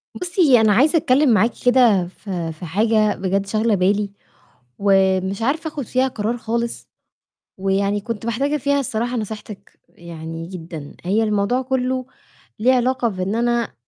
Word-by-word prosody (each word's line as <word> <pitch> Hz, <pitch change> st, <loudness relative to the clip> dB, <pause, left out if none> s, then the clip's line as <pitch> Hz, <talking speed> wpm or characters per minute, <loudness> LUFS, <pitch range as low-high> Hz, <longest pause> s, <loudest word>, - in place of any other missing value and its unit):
بُصّي، 335 Hz, -, +3 dB
أنا 215 Hz, -1 st, +4 dB
عايزة 295 Hz, -, +4 dB
أتكلِّم 285 Hz, 0 st, +3 dB
معاكِ 225 Hz, +3 st, +3 dB
كده 235 Hz, -8 st, +4 dB
في 180 Hz, -3 st, -5 dB
في 160 Hz, +3 st, -9 dB
حاجة 215 Hz, +4 st, +2 dB
بجد 195 Hz, +1 st, -1 dB
شاغلة 215 Hz, +2 st, +1 dB
بالي 200 Hz, +2 st, +1 dB, 0.7 s
ومش 195 Hz, 0 st, +2 dB
عارفة 300 Hz, +7 st, -1 dB
آخُد 290 Hz, -4 st, -6 dB
فيها 255 Hz, +4 st, +1 dB
قرار 230 Hz, -1 st, -2 dB
خالص، 235 Hz, 0 st, -3 dB, 0.7 s
ويعني 200 Hz, +1 st, 0 dB
كنت 225 Hz, +1 st, -5 dB
محتاجة 275 Hz, +6 st, 0 dB
فيها 285 Hz, +1 st, +1 dB
الصراحة 240 Hz, -1 st, -2 dB
نصيحتِك 215 Hz, -2 st, -7 dB
يعني 165 Hz, -1 st, -8 dB
جدًا. 165 Hz, -5 st, -9 dB
هي 200 Hz, +5 st, +1 dB
الموضوع 210 Hz, +4 st, +1 dB
كُلّه 255 Hz, 0 st, -1 dB, 0.5 s
ليه 245 Hz, +5 st, +4 dB
علاقة 250 Hz, -1 st, +1 dB
بإن 190 Hz, 0 st, -3 dB
أنا 235 Hz, 0 st, 0 dB
220 Hz, 145 wpm, -20 LUFS, 195-250 Hz, 0.7 s, أنا